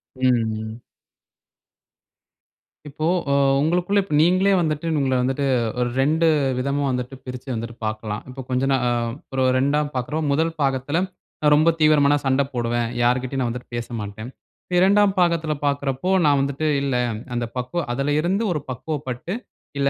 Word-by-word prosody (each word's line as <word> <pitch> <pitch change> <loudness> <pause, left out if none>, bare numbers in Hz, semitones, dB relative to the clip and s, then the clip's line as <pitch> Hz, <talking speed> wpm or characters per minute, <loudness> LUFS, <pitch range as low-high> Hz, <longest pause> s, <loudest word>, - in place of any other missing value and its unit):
ம், 130 0 +1 0.2
ம். 110 +1 -5 2.1
இப்போ 155 +3 -3 0.2
அ - - +3 0.3
உங்களுக்குள்ள 180 +6 +2 0.2
நீங்களே 185 +5 +4
வந்துட்டு 155 -1 -1
உங்கள 130 -1 +1
வந்துட்டு 135 +3 -1 0.4
ஒரு 120 0 +1
2 160 +4 +2 0.3
விதமா 140 +2 -1
வந்துட்டு 125 +1 -3
பிரிச்சு 125 +1 -8
வந்துட்டு 115 0 -5
பார்க்கலாம். 110 -1 -3
இப்ப 130 +1 -7
கொஞ்சம் 130 +2 +1
நா 135 - +4 0.6
ஒரு 130 0 +1
2 145 +3 +1
பார்க்குறோம். 150 +5 -2
முதல் 160 +3 +1
பாகத்துல 135 +4 0 0.5
ரொம்ப 155 +3 +5
தீவிரமான 150 -2 +5
சண்ட 135 +1 +3
போடுவேன். 120 -1 -1 0.2
யாருக்கிட்டயும் 130 +2 +1
நான் 120 - 0
வந்துட்டு 125 0 -9
பேசமாட்டேன். 115 -1 -5 0.6
2 200 0 +4
பாகத்துல 165 -3 +2
பார்க்குறப்போ, 140 +3 -1 0.2
நான் 145 -2 +4
வந்துட்டு 140 +3 -1
இல்ல 140 -2 -1 0.4
அந்த 120 - -1
பக்குவம் 125 +6 -3
அதுல 140 +3 -1
இருந்து 190 +7 0
ஒரு 150 - -1
பக்குவப்பட்டு, 135 +3 -4 0.4
இல்ல 140 0 +2
135 Hz, 135 wpm, -22 LUFS, 125-155 Hz, 2.1 s, ரொம்ப